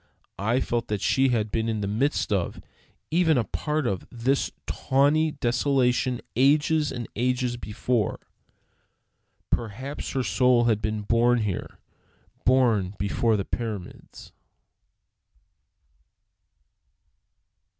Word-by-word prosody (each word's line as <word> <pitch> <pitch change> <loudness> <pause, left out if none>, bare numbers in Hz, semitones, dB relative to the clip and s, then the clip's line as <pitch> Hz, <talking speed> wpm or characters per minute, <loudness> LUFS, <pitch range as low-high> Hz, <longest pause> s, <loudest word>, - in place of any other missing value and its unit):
I 115 +6 +1
felt 120 -1 -1
that 105 -1 -2
she 135 +6 +2
had 110 -4 0
been 115 0 0
in 110 -2 -2
the 100 - -2
midst 115 +2 0
of, 95 -4 -1 0.5
even 165 -3 +3
a 120 - +2
part 150 +4 -2
of, 100 -5 -2
this 130 +3 0 0.2
tawny 145 +3 +2
desolation 125 -1 +1
ages 150 +4 +3
and 120 -2 -5
ages 125 +1 0
before. 115 0 -2 1.3
Perhaps 120 +6 -3
her 130 -1 0
soul 125 -1 +3
had 110 -3 +2
been 110 0 -2
born 120 +2 +3
here, 100 -4 -4 0.7
born 115 -7 +3
before 110 +2 +1
the 100 - -2
pyramids. 110 -6 -6
120 Hz, 110 wpm, -25 LUFS, 110-135 Hz, 1.3 s, even